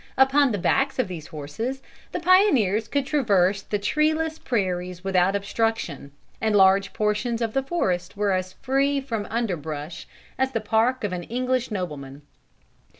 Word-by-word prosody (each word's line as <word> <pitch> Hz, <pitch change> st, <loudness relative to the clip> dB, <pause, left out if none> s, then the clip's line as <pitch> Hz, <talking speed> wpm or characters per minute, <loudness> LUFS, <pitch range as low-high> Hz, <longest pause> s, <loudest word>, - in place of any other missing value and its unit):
Upon 270 Hz, +1 st, +4 dB
the 205 Hz, -, -1 dB
backs 270 Hz, +9 st, +1 dB
of 255 Hz, -, +1 dB
these 170 Hz, -4 st, -7 dB
horses, 200 Hz, -, -5 dB, 0.3 s
the -, -, -3 dB
pioneers 285 Hz, -, +4 dB
could 280 Hz, +3 st, -1 dB
traverse 200 Hz, -9 st, +2 dB
the 205 Hz, -, -2 dB
treeless 310 Hz, +8 st, 0 dB
prairies 180 Hz, -5 st, -2 dB
without 190 Hz, 0 st, +2 dB
obstruction, 200 Hz, -, -2 dB, 0.3 s
and 220 Hz, -1 st, +1 dB
large 195 Hz, 0 st, +5 dB
portions 215 Hz, +3 st, -1 dB
of 225 Hz, -2 st, -2 dB
the 270 Hz, -, +2 dB
forest 190 Hz, -, -2 dB
were 205 Hz, -1 st, +1 dB
as 185 Hz, 0 st, -1 dB
free 275 Hz, +4 st, +1 dB
from 230 Hz, -6 st, -4 dB
underbrush 160 Hz, -9 st, -4 dB, 0.3 s
as 265 Hz, 0 st, +1 dB
the 225 Hz, -, +1 dB
park 225 Hz, +4 st, +1 dB
of 205 Hz, -3 st, -1 dB
an 180 Hz, -, -3 dB
English 255 Hz, +1 st, -1 dB
nobleman. 150 Hz, -8 st, -5 dB
215 Hz, 150 wpm, -24 LUFS, 185-265 Hz, 0.3 s, large